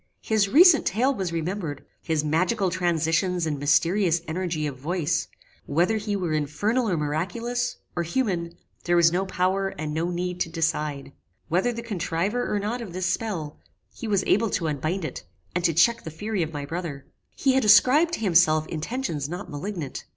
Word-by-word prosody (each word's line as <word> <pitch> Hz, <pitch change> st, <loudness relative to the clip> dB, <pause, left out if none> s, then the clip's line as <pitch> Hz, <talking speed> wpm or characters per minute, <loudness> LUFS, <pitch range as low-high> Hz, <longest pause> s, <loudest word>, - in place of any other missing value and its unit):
His 215 Hz, -3 st, +2 dB
recent 325 Hz, -, +7 dB
tale 250 Hz, +8 st, +2 dB
was 190 Hz, -8 st, -3 dB
remembered: 165 Hz, -3 st, -3 dB, 0.2 s
his 160 Hz, -2 st, -1 dB
magical 180 Hz, +6 st, +1 dB
transitions 175 Hz, 0 st, +1 dB
and 150 Hz, -3 st, -2 dB
mysterious 165 Hz, +4 st, +2 dB
energy 165 Hz, -2 st, -2 dB
of 145 Hz, -3 st, -3 dB
voice: 165 Hz, +4 st, -1 dB, 0.4 s
Whether 175 Hz, +9 st, +2 dB
he 210 Hz, -1 st, -2 dB
were 180 Hz, -5 st, -1 dB
infernal 205 Hz, -, 0 dB
or 175 Hz, -, 0 dB
miraculous, 230 Hz, +12 st, -2 dB, 0.2 s
or 175 Hz, -, 0 dB
human, 170 Hz, -3 st, -2 dB, 0.3 s
there 175 Hz, -, +2 dB
was 170 Hz, -1 st, +5 dB
no 190 Hz, +3 st, 0 dB
power 190 Hz, +1 st, 0 dB
and 150 Hz, 0 st, -4 dB
no 165 Hz, +3 st, -1 dB
need 180 Hz, 0 st, -3 dB
to 170 Hz, -, -1 dB
decide. 155 Hz, -4 st, -2 dB, 0.4 s
Whether 185 Hz, +9 st, +2 dB
the 235 Hz, 0 st, -6 dB
contriver 200 Hz, +2 st, -2 dB
or 210 Hz, -, +1 dB
not 215 Hz, +5 st, -2 dB
of 200 Hz, -7 st, -7 dB
this 185 Hz, 0 st, -2 dB
spell, 175 Hz, -9 st, -3 dB, 0.3 s
he 230 Hz, -, -7 dB
was 200 Hz, -3 st, +1 dB
able 220 Hz, +3 st, +2 dB
to 170 Hz, -, -1 dB
unbind 155 Hz, +5 st, -2 dB
it, 135 Hz, -, -6 dB, 0.3 s
and 180 Hz, -, -1 dB
to 170 Hz, -, +4 dB
check 230 Hz, +8 st, +4 dB
the -, -, -6 dB
fury 205 Hz, +5 st, -3 dB
of 160 Hz, -1 st, -2 dB
my 145 Hz, -2 st, -5 dB
brother. 155 Hz, -3 st, -5 dB, 0.3 s
He 270 Hz, -2 st, +2 dB
had 265 Hz, -1 st, +2 dB
ascribed 270 Hz, +10 st, +6 dB
to -, -, -9 dB
himself 165 Hz, -5 st, +4 dB
intentions 160 Hz, -, -3 dB
not 175 Hz, 0 st, -6 dB
malignant. 150 Hz, -2 st, -5 dB
175 Hz, 180 wpm, -25 LUFS, 160-210 Hz, 0.4 s, recent